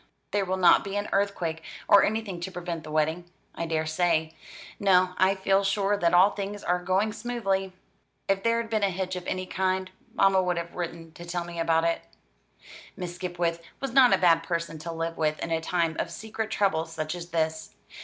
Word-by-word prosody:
there 205 -1 +1
will 185 0 -1
not 180 -2 +6
be 195 0 -5
an 205 0 -1
earthquake, 185 -5 -1 0.3
or 200 - +7
anything 210 -4 -1
to 180 +2 -5
prevent 170 -2 -5
the 155 - -9
wedding, 155 +3 0 0.3
I 170 - -4
daresay. 160 0 0 0.5
No, 185 -2 +4
I 190 +1 +4
feel 195 +1 +2
sure 200 +1 +1
that 170 -4 +2
all 190 +3 +6
things 200 0 -5
are 180 0 0
going 190 +4 +1
smoothly. 205 -5 -2 0.6
If 195 0 +1
there 230 +2 +2
had 230 - -3
been 215 -1 +1
a 200 - +3
hitch 185 0 -3
of 180 -1 -6
any 185 0 -2
kind, 185 0 -1 0.2
mamma 195 -1 +4
would 180 -1 0
have 170 0 -4
written 165 -2 -6
to 170 - -11
tell 175 0 -3
me 170 -1 -7
about 165 0 +2
it." 165 0 +1 1.0
Miss 180 -1 -5
Skipwith 175 -2 -2 0.2
was 270 -3 -4
not 260 -2 +7
a - - +5
bad 165 -2 +4
person 170 -1 -3
to 165 +2 -5
live 165 0 -3
with 155 -1 0
in 165 - -5
a 165 0 +1
time 165 -1 0
of - - -1
secret 220 +4 -5
trouble 180 -6 +1
such 155 -1 -4
as 175 -1 -7
this. 160 -1 -2
180 Hz, 205 wpm, -27 LUFS, 165-195 Hz, 1.0 s, or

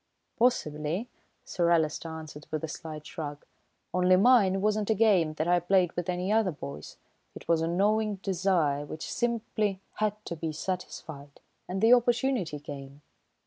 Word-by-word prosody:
"Possibly," 180 - 0 0.4
Sir 170 -1 0
Alister 165 -1 +1
answered 155 -2 -9
with 155 -1 -3
a - - -1
slight 155 -1 -7
shrug, 145 -2 -7 0.5
"only 180 0 +4
mine 195 -2 +5
wasn't 210 +1 0
a 220 - +3
game 190 -8 +3
that 155 +2 -1
I 175 0 +4
played 180 0 +2
with 175 0 -3
any 180 +2 -1
other 220 -3 +3
boys, 75 - -8 0.4
it - - -11
was 165 -1 +3
a 165 - 0
gnawing 210 +4 +1
desire, 180 -7 0
which 155 +2 -6
simply 215 -4 -1 0.2
had 215 -1 +1
to 170 - -4
be 160 -1 -4
satisfied; 155 -4 -6 0.3
and 190 +1 -2
the 225 +2 +7
opportunity 240 - +2
came. 140 0 -9
180 Hz, 155 wpm, -28 LUFS, 155-210 Hz, 0.5 s, the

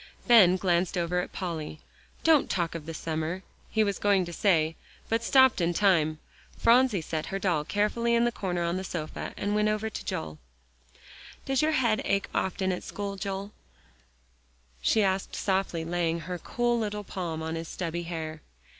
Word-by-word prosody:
Ben 205 -7 +7
glanced 180 -1 +1
over 175 +1 0
at 180 - -4
Polly. 160 -4 -5 0.4
"Don't 320 -3 +4
talk 170 -3 -1
of 165 -2 -7
the 165 - -4
summer," 160 +4 -3 0.3
he 220 - +2
was 200 -2 -1
going 200 -3 +3
to 175 - -7
say, 165 -5 +2 0.3
but 230 +1 +1
stopped 260 -4 +5
in 170 0 +1
time. 165 -6 +3 0.4
Phronsie 240 -5 +4
set 155 0 -4
her 195 - -2
doll 175 -6 0
carefully 220 +7 +1
in 235 0 +3
the 240 - +2
corner 180 -6 -2
of 170 +1 0
the 190 - -3
sofa, 160 -4 -5
and 205 +1 -1
went 210 0 +2
over 215 +1 -1
to - - -6
Joel. 75 -1 -4 1.1
"Does 270 -1 +1
your 310 +1 +2
head 235 -6 +2
ache 200 0 0
often 190 0 0
at 180 - -3
school, 200 -1 -5
Joel?" 195 0 -4 1.3
she 220 - +3
asked, 190 0 -1
softly 190 -4 -1
laying 170 -1 -1
her 180 +2 -5
cool 240 +5 0
little 210 -1 -3
palm 170 -5 -4
on 160 0 -3
his 165 0 -4
stubby 170 -1 -3
hair. 160 -2 -5
185 Hz, 175 wpm, -28 LUFS, 165-210 Hz, 1.3 s, Ben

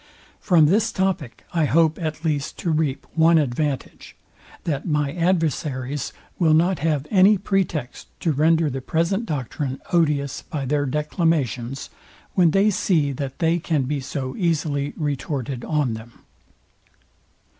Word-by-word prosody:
From 170 -5 +4
this 215 +8 +3
topic, 190 -9 -2
I 165 -3 +2
hope 160 +2 +3
at 155 0 -4
least 145 -3 -1
to 170 - -1
reap 150 -3 0
one 165 +1 +5
advantage, 145 -1 -2 0.5
that 145 -2 -2
my 150 -3 0
adversaries 150 -6 -1 0.3
will 160 -3 +4
not 175 +3 +2
have 150 -2 0
any 200 +1 +6
pretext 185 -9 -2
to 165 - +1
render 160 +2 +3
the 135 -2 -3
present 170 - 0
doctrine 135 -1 -3
odious 145 -5 +1
by 145 -4 -5
their 145 +1 0
declamations, 140 - -1 0.4
when 175 -3 +4
they 195 +5 +3
see 160 -7 +1
that 135 0 -5
they 165 +1 +2
can 155 -4 0
be 140 +2 -2
so 130 0 -4
easily 150 -5 0
retorted 140 -4 -3
on 150 -6 0
them. 110 +1 -8
150 Hz, 135 wpm, -23 LUFS, 140-165 Hz, 0.5 s, any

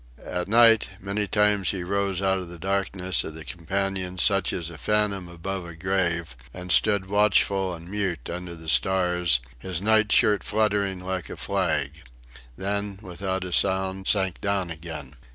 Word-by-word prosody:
At 90 0 -3
night, 115 0 +6
many 100 +2 -2
times 105 -2 +2
he 95 -3 -2
rose 100 0 -1
out 95 0 +2
of 90 - -7
the 85 - -9
darkness 95 0 0
of 80 - -7
the 80 -1 -9
companion, 95 +4 -3
such 100 +1 +2
as 85 -1 -3
a 80 - -10
phantom 105 -4 0
above 90 +2 -5
a 85 -1 -9
grave, 85 -4 -1 0.2
and 90 0 -6
stood 100 -3 +3
watchful 100 -2 +2
and 85 +1 -12
mute 95 -8 -3
under 90 0 -6
the 80 -1 -12
stars, 90 -5 +2 0.2
his 90 +4 -3
night 110 +1 +3
shirt 105 -1 +4
fluttering 100 -3 0
like 95 -1 -4
a - - -7
flag 75 +4 -1 0.6
then, 100 0 -3
without 95 0 -3
a 90 -1 -5
sound, 95 +1 +1
sank 95 -3 +1
down 100 -3 -1
again. 80 -5 -8
95 Hz, 165 wpm, -25 LUFS, 85-100 Hz, 0.6 s, night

